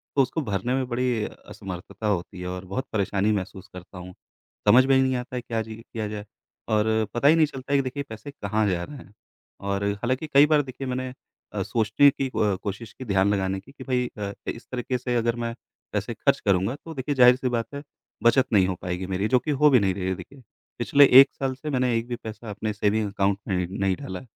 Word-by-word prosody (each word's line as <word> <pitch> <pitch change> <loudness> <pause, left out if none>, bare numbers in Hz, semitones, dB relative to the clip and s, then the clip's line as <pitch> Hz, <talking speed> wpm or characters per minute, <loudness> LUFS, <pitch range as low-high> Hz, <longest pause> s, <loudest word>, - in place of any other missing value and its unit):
तो 140 - +5
उसको 135 +5 0
भरने 110 +1 -1
में 130 -1 -1
बड़ी 120 -2 0
असमर्थता 95 +3 -7
होती 95 -1 -2
है 90 - -4
और 90 +1 -5
बहुत 130 +9 -3
परेशानी 100 0 +1
महसूस 95 0 -4
करता 90 +1 -11
हूँ। 90 0 -9 0.5
समझ 130 +5 +7
में 135 0 +4
ही 130 - +5
नहीं 130 -1 +1
आता 125 +1 -5
है 125 - -2
क्या 115 -2 -2
जी 110 0 -7
किया 115 -1 -6
जाए 105 0 -6 0.5
और 105 0 +3 0.3
पता 120 +4 +2
ही 160 - +7
नहीं 160 -1 +5
चलता 135 0 -6
है - - +5
कि - - +1
देखिए 140 +2 -4
पैसे 110 +6 -8
कहाँ 105 -3 -1
जा 85 -1 -1
रहे 145 +6 -8
हैं, 105 - -14 0.5
और 100 0 -2 0.2
हालाँकि 130 +5 -1
कई 140 +2 +8
बार 150 -1 +4
देखिए 130 0 -7
मैंने 130 0 -2 0.4
अ, - - -1
सोचने 115 +5 +4
की 135 0 -2
अ, 105 -6 +1
कोशिश 105 +3 -5
की 130 - -9
ध्यान 100 -1 +2
लगाने 95 -1 -1
की 120 +8 -16
कि 135 -2 -11
भई 125 -1 0
अ, 100 -1 -3 0.2
इस 115 - -5
तरीक़े 125 0 -2
से 125 0 -2
अगर 115 0 +1
मैं 115 -1 -3 0.4
पैसे - - -2
ख़र्च - - +1
करूँगा 100 +5 +2
तो 165 - -7
देखिए 135 +2 -2
ज़ाहिर-सी 125 0 +5
बात 120 +3 -2
है 140 - -5 0.4
बचत 120 +3 +5
नहीं 95 -3 +5
हो 95 - -1
पाएगी 90 +1 -3
मेरी 95 +2 -1
जो 125 +1 +4
कि 150 - -3
हो 150 +1 +5
भी 130 -4 +6
नहीं 95 -2 +1
रही 95 -1 -3
है 95 - +1
देखिए। 135 +6 -12 0.4
पिछले 140 +4 +6 0.2
1 135 - +5
साल 135 -1 -2
से 150 +3 -6
मैंने 130 -3 +1
एक 115 +1 -3
भी 120 - -3
पैसा 110 0 -7
अपने 105 +1 -3
सेविंग 105 +1 +1
अकाउंट 100 0 0
में 90 -3 0
नहीं 95 -1 0
डाला 95 0 -6
है। - - -14
115 Hz, 235 wpm, -25 LUFS, 100-130 Hz, 0.5 s, कई